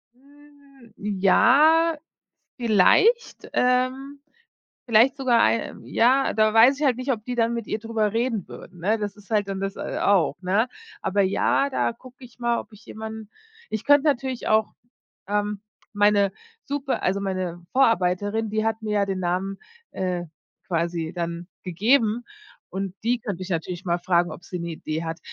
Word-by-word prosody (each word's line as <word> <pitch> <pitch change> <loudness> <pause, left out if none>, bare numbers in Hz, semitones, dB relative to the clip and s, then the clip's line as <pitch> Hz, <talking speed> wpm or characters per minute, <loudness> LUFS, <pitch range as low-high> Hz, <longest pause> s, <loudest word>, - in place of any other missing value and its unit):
Hm, 280 -2 -21 0.3
ja, 310 - +5 0.6
vielleicht, 245 - +3
ähm 255 +3 0 0.7
vielleicht 235 +3 +4
sogar, 250 -4 +3
äh, 230 - -3
ja, 260 +4 +2
da 215 0 +2
weiß 245 +6 +6
ich - - 0
halt 260 -4 +3
nicht, 255 +2 -1
ob 215 -2 -5
die 250 -1 -4
dann 230 0 +1
mit 230 -3 -5
ihr - - -2
drüber 220 -2 -1
reden 230 -4 -1
würden, 175 -1 -12
ne? 210 +6 +1
Das 205 -1 -4
ist 205 0 -19
halt 210 -2 +1
dann 195 -1 -4
das, 195 0 -3
äh, - - -4
auch, 195 -5 +3
ne? 200 +7 +1 0.3
Aber 200 +1 +1
ja, 200 +8 +1
da 260 - 0
gucke 255 +2 -15
ich 245 0 -17
mal, 235 0 +1
ob 215 - -9
ich 210 - -16
jemanden 220 -1 -8 0.4
Ich 220 -1 -4
könnt 290 -1 +5
natürlich 265 -4 -1
auch, 215 0 +2 0.5
ähm, 205 0 -1 0.3
meine 205 -1 +3 0.3
Super 280 -1 -3
also 195 +2 +1
meine 185 -3 -4
Vorarbeiterin, 215 -3 +1
die 215 +1 -1
hat 225 0 -1
mir 215 - -4
ja 200 -1 +2
den 190 -1 -3
Namen, 185 +2 -2 0.3
äh, 180 -2 -2 0.4
quasi 170 -1 -2
dann 170 0 -4 0.2
gegeben 220 +5 +1 0.4
und 190 0 -4
die 240 +1 +2
könnt 200 -4 -5
ich 185 +1 -6
natürlich 175 +1 -3
mal 175 -1 0
fragen, 175 -1 +1
ob 160 - -10
sie 180 - -6
'ne 170 0 -4
Idee 160 0 -4
hat. 165 0 -4
215 Hz, 170 wpm, -24 LUFS, 190-250 Hz, 0.7 s, weiß